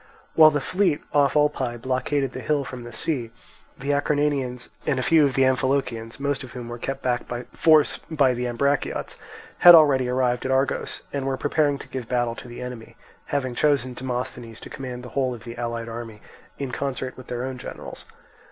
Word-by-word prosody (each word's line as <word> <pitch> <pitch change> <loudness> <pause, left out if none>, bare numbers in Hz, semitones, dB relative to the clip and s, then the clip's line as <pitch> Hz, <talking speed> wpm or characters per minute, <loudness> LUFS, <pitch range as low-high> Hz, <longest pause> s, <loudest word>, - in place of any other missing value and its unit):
While 155 -1 +8
the 150 -1 0
fleet 180 -1 +1
off 145 -1 +3
Olpae 145 -5 +1
blockaded 130 +2 -1
the 130 - -6
hill 145 +2 0
from 125 -2 -8
the 120 - -8
sea, 120 0 -2 0.5
the 140 +2 -2
Acarnanians 145 -4 0 0.2
and 135 - +2
a 130 - 0
few 160 +1 +5
of 135 - -4
the 135 - +4
Amphilochians, 130 -3 0
most 140 0 -1
of 125 - -10
whom 120 -2 -7
were 120 0 -6
kept 135 +2 -4
back 125 -1 0
by 120 0 -4
force 155 -2 +4
by 140 -5 +3
the 125 0 -2
Ambraciots, 140 +4 -1 0.4
had 175 -1 +11
already 135 -5 +5
arrived 125 -1 +1
at 130 - -2
Argos, 135 +1 0
and 140 -1 -2
were 135 -1 -1
preparing 145 0 +1
to - - -11
give 125 -3 -6
battle 120 -2 +1
to 120 - -10
the 120 +1 -8
enemy, 120 -2 -8 0.3
having 130 -3 -2
chosen 135 -1 +1
Demosthenes 125 -2 -5
to - - -10
command 125 -2 -6
the 125 - -8
whole 130 -2 0
of 115 - -13
the 120 -1 -8
allied 115 -1 -3
army 115 -2 -7 0.4
in 135 -2 -4
concert 130 0 -3
with 130 - -12
their 120 0 -3
own 130 -1 -5
generals. - - -8
130 Hz, 200 wpm, -24 LUFS, 120-140 Hz, 0.5 s, had